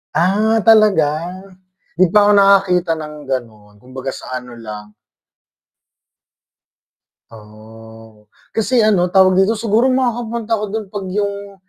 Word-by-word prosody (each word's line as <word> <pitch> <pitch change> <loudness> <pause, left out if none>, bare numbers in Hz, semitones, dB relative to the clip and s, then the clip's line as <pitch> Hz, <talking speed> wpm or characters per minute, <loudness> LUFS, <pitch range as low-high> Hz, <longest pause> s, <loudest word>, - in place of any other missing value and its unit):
Ah, 210 +7 +2
talaga? 210 -9 +5 0.9
'Di 180 -1 +2
pa 205 0 +4
ako - - +4
nakakita 195 -3 +3
ng 150 0 -8 0.2
ganun, 110 -5 -6
kumbaga 130 +3 -7
sa - - -11
ano 125 -2 -9
lang 105 -1 -9 2.4
Oh. 110 0 -16 0.2
Kasi 230 +1 +1
ano 195 -5 +2
tawag 185 0 +3
dito 200 +4 +2
siguro 225 +3 +1
makakapunta 235 -3 -2
ako 215 -2 0
dun 215 +1 -5
'pag 205 -2 -6
yung 200 -1 -4
190 Hz, 120 wpm, -17 LUFS, -, 2.4 s, talaga